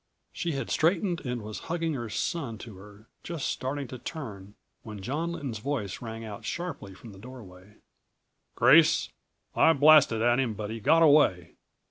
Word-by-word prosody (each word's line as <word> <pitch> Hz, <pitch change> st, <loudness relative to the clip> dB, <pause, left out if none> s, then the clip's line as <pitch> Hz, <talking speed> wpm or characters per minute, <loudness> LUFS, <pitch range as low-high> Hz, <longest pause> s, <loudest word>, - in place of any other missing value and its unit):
She 170 Hz, -2 st, -3 dB
had 135 Hz, -4 st, -4 dB
straightened 175 Hz, +2 st, +1 dB
and 125 Hz, -2 st, -4 dB
was 105 Hz, 0 st, -7 dB
hugging 165 Hz, -1 st, -1 dB
her 120 Hz, -5 st, -5 dB
son 125 Hz, +1 st, -3 dB
to 110 Hz, -2 st, -11 dB
her, 105 Hz, +2 st, -15 dB, 0.2 s
just 165 Hz, -4 st, -5 dB
starting 135 Hz, +1 st, -3 dB
to 130 Hz, -, -8 dB
turn, 105 Hz, -, -8 dB, 0.3 s
when 105 Hz, -2 st, -9 dB
John 160 Hz, -, -3 dB
Lynton's 130 Hz, -9 st, -5 dB
voice 115 Hz, -6 st, -4 dB
rang 115 Hz, -1 st, -7 dB
out 105 Hz, -2 st, -8 dB
sharply 165 Hz, -, -6 dB
from 115 Hz, +3 st, -13 dB
the 95 Hz, -, -14 dB
doorway. 105 Hz, -5 st, -13 dB, 0.8 s
"Grace! 150 Hz, +7 st, +5 dB, 0.5 s
I 165 Hz, -, +5 dB
blasted 145 Hz, -6 st, +5 dB
at 120 Hz, +1 st, +3 dB
him 120 Hz, -5 st, -1 dB
but 105 Hz, +1 st, -5 dB
he 115 Hz, -, -5 dB
got 160 Hz, +8 st, +4 dB
away! 140 Hz, -, +3 dB
125 Hz, 165 wpm, -27 LUFS, 105-155 Hz, 0.8 s, Grace